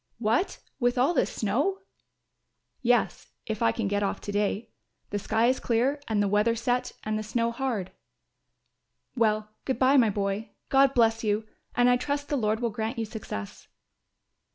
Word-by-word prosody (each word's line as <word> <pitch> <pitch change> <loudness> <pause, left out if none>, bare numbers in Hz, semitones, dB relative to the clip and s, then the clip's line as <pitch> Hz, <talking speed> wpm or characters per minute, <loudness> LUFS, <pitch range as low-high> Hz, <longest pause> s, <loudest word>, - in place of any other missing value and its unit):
"What, 235 - +1 0.2
with 245 0 +1
all 265 +7 +3
this - - +1
snow!" 265 - 0 1.0
"Yes, 245 -2 +1
if 220 -1 -4
I 230 - +4
can 225 -3 -2
get 205 +1 0
off 200 - -1
to 205 - -5
day; 205 +2 -1 0.4
the 205 - -1
sky 225 +3 +1
is 255 +2 +2
clear 255 +5 +1
and 210 -2 +1
the - - +1
weather 210 +3 +2
set 245 +2 -1
and 215 0 -1
the - - -2
snow 230 +2 0
hard." 230 -7 -2 1.2
"Well, 215 -3 +1
good 265 - -1
bye, 270 +2 +5
my 235 -4 +5
boy. 200 +1 -2 0.2
God 275 0 +4
bless 225 -1 +3
you 215 0 0 0.3
and 245 0 +4
I 245 0 +5
trust 285 +3 -3
the 290 - +1
Lord 220 -3 0
will 235 -2 0
grant 220 +2 -3
you 225 - -1
success." 210 - -7
230 Hz, 175 wpm, -27 LUFS, 210-250 Hz, 1.2 s, bye